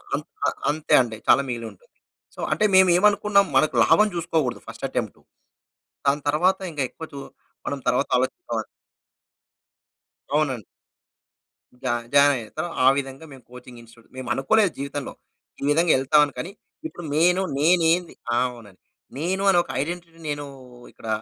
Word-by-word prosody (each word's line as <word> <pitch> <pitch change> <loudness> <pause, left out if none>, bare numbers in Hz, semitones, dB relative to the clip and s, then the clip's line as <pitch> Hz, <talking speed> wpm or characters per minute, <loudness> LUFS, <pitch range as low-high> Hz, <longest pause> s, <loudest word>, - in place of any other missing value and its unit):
అంత్ - - -6 0.4
అంతే 155 +1 -1
అండి 115 -3 -4
చాలా 140 - +6
మిగిలుంటుంది. 115 -5 -7 0.5
సో, - - -15
అంటే 165 +8 +2
మేమేమనుకున్నాం 200 +2 +4
మనకు 155 - +3
లాభం 215 0 +5
చూసుకోకూడదు 160 -6 -1
ఫస్ట్ - - -7
అటెంప్టు. - - -4 0.9
దాని 145 +1 +2
తర్వాత 185 +6 +2
ఇంకా 145 -3 -2
ఎక్కువ 160 - -9
చు 140 - -7 0.5
మనం 140 - -2
తర్వాత 125 - +2
ఆలోచిస్తాం 130 - -2 1.7
అవునండి. 135 -8 0 1.2
జ - - -8 0.3
జాయినయ్యతరు 145 +2 +2 0.2
ఆ - - +7
విధంగా 135 +2 -5
మేము 130 -3 -13
కోచింగ్ 125 -1 -12
ఇన్‌స్టిట్యూట్‌లో 115 0 -20
మేమనుకోలేదు 160 +10 +1
జీవితంలో 140 -1 -5 0.5
ఈ - - -5
విధంగా 165 +2 +3
ఎళ్తామని. 145 +1 +3
కానీ, 170 +9 -5 0.4
ఇప్పుడు 175 - -10
నేను 180 +4 +3 0.2
నేనేంది 170 +2 +3 0.2
ఆ! - - +2
అవునండి. 110 -6 -15 0.4
నేను 185 +6 -1
అని 180 - +4
ఒక - - -21
ఐడెంటిటీని 165 +1 -6
నేను 145 0 -3 0.5
ఇక్కడ 115 - -12
150 Hz, 130 wpm, -23 LUFS, 130-175 Hz, 1.7 s, ఆ